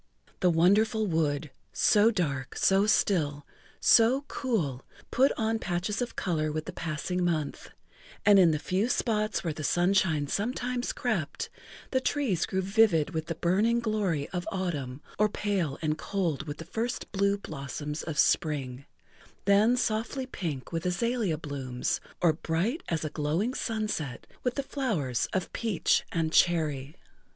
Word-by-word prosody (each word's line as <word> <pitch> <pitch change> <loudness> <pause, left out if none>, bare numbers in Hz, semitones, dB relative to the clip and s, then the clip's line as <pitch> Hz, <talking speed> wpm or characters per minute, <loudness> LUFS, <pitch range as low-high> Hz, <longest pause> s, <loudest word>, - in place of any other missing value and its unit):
The 180 - +4
wonderful 210 +7 +3
wood, 155 -4 0 0.2
so 210 +1 +5
dark, 150 - -2
so 195 +2 +3
still, 150 -9 +1 0.3
so 240 +4 +5
cool, 160 - -2 0.3
put 265 +3 +4
on 225 0 0
patches 190 +4 -2
of 245 -1 -3
color 155 -4 -1
with 155 0 -3
the - - -6
passing 165 +3 -2
month, 160 -5 -2 0.6
and 205 -1 +7
in 180 -3 +7
the 155 - +1
few 190 +9 0
spots 215 -3 0
where 165 -3 -1
the 155 - -7
sunshine 175 -2 +2
sometimes 245 - -2
crept, 205 - -2 0.4
the 260 - +2
trees 255 - 0
grew 190 0 -1
vivid 195 -6 +3
with 160 -2 -3
the 165 - -3
burning 205 +8 +2
glory 205 -10 -1
of 180 -1 -4
autumn 150 -8 -3 0.2
or 210 0 +4
pale 195 -9 -1
and 155 0 0
cold 165 -6 -2
with 145 0 -5
the 165 - -8
first 225 +7 -3
blue 200 0 +2
blossoms 150 -3 -5
of 160 -3 -5
spring, 140 -4 +1 0.6
then 210 +5 +4
softly 245 +3 -1
pink 160 - -5
with 165 -1 -2
azalea 195 -1 0
blooms 140 +1 -3 0.2
or 165 -3 +5
bright 175 - -1
as 160 -2 -1
a 155 - -3
glowing 160 +11 -1
sunset 215 - -3 0.2
with 250 -1 -1
the 280 - -1
flowers 195 - -1
of 185 -2 -2
peach 220 -7 +1
and 160 -1 -1
cherry. 155 -4 +2
180 Hz, 150 wpm, -28 LUFS, 155-215 Hz, 0.6 s, and